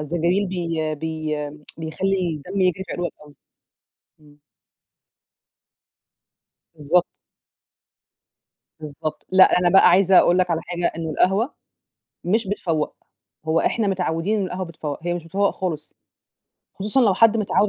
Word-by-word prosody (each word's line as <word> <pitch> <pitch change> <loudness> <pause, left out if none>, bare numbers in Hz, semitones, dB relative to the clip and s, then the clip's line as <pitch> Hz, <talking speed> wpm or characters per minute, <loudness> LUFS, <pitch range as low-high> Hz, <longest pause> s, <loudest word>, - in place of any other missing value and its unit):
الزنجبيل 175 +6 0
بي 165 -4 -2
بي 155 0 -4 0.4
بيخلي 180 +3 -1 0.2
الدم 195 0 -2
يجري 185 +1 +1
في - - -7
عروقك 175 -1 -3
أوي. 145 -1 -17 0.9
إمم. 150 0 -21 2.3
بالضبط. 160 +3 +1 1.7
بالضبط، 155 0 -6
لأ، 185 -1 +6
أنا 175 -1 +3
بقى 195 - +6
عايزة 185 +1 +5
أقول 175 - +5
لك 180 -1 +1
على 165 - 0
حاجة، 175 -1 -2
إن 165 -1 -4
القهوة 195 - +1 0.7
مش 205 +4 +1
بتفوّق، 165 -6 -2 0.5
هو 160 +1 +2
إحنا 225 -3 0
متعودين 185 +2 -1
إن 195 - 0
القهوة 185 +1 -4
بتفوّق، 155 -3 -6
هي 175 0 -1
مش 175 -2 -6
بتفوّق 200 +4 0
خالص، 160 -5 -5 0.8
خصوصًا 210 +7 0
لو 210 -6 +4
حد 225 +1 +5
متعود 210 -1 +1
175 Hz, 130 wpm, -22 LUFS, 160-195 Hz, 2.3 s, لأ